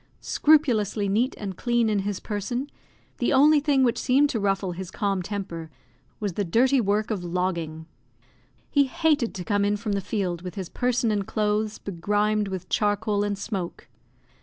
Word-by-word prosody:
Scrupulously 230 -10 +2
neat 230 +7 +1
and 195 -3 -5
clean 240 +2 +1
in 210 -2 +1
his 200 -1 -2
person, 240 +7 -4 0.5
the 240 - +1
only 295 +3 +6
thing 280 -2 +2
which 240 -2 +2
seemed 280 +3 +3
to 225 - -1
ruffle 195 -2 0
his 180 0 -6
calm 200 -2 -1
temper 175 -4 -5 0.5
was 205 -4 -2
the 205 - -1
dirty 250 +9 +3
work 210 +2 0
of 195 -5 -2
logging; 170 -3 -2 0.9
he 285 -1 +4
hated 290 -2 +1
to 185 - -4
come 205 -2 +1
in 205 +1 +1
from 210 0 -4
the 200 0 0
field 185 -4 -2
with 180 -2 -7
his 190 -3 -5
person 245 -2 0
and 205 -2 -1
clothes 215 0 0
begrimed 205 +3 0
with 190 -2 -5
charcoal 205 0 +1
and 205 -1 -1
smoke. 195 -4 -5
205 Hz, 170 wpm, -25 LUFS, 195-235 Hz, 0.9 s, only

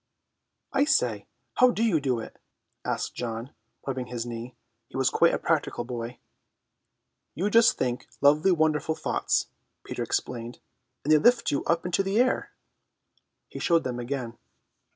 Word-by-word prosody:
"I 275 0 +4
say, 310 - +1 0.3
how 255 - +7
do 230 -2 0
you 185 -10 +2
do 130 -4 0
it?" 110 - -9 0.4
asked - - -2
John, 115 +2 -5 0.3
rubbing 130 -2 -3
his 120 -1 -4
knee. 120 +1 -7 0.3
He - - -8
was - - +2
quite - - +4
a - - 0
practical - - 0
boy. 120 0 -6 1.2
"You 195 +7 -1
just 230 +1 +5
think 125 -1 -2
lovely 150 +6 +5
wonderful 155 -1 +1
thoughts," - - 0 0.3
Peter - - -5
explained, 120 -1 -3 0.5
"and 155 - +3
they 155 - +6
lift 240 +6 +4
you 140 - 0
up 170 0 +1
in 180 - -3
the 195 +3 +1
air." 255 +1 +2 1.0
He - - -8
showed 165 -1 +3
them 125 -1 -3
again. 120 -1 -4
140 Hz, 150 wpm, -27 LUFS, 120-180 Hz, 1.2 s, how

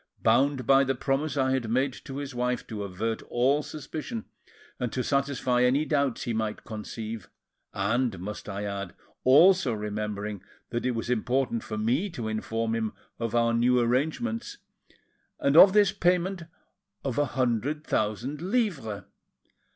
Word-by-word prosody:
Bound 130 +3 +3
by 135 +3 +6
the 135 0 0
promise 135 +3 -1
I 130 -1 +2
had 130 -4 -1
made 130 +3 +1
to 135 -2 -6
his 140 -2 -5
wife 125 0 -1
to 110 -3 -6
avert 100 +4 -3
all 135 +5 +2
suspicion 150 -6 -6 0.5
and 125 -2 -2
to 130 - -1
satisfy 140 -3 +1
any 130 +5 +3
doubts 140 -5 0
he 120 - -2
might 110 -1 -2
conceive, 110 -1 -6 0.4
and, 110 +2 0
must 105 +3 -6
I 100 +1 -4
add, 100 -1 -5 0.3
also 155 +1 +6
remembering 105 -1 -4 0.3
that 120 +1 -1
it 125 - 0
was 115 +1 -2
important 125 0 0
for 110 - -5
me 125 - +1
to 120 -9 -4
inform 110 +1 -2
him 110 -2 -1 0.3
of 115 0 -2
our 115 0 +3
new 125 +2 +3
arrangements, 160 - -1 0.8
and 140 +1 +2
of 190 +4 +10
this 205 -2 +5
payment 180 -2 +1 0.6
of 135 -1 -1
a 145 - +3
hundred 130 +5 0
thousand 120 +8 -1
livres." 175 - -1
125 Hz, 150 wpm, -27 LUFS, 110-140 Hz, 0.8 s, of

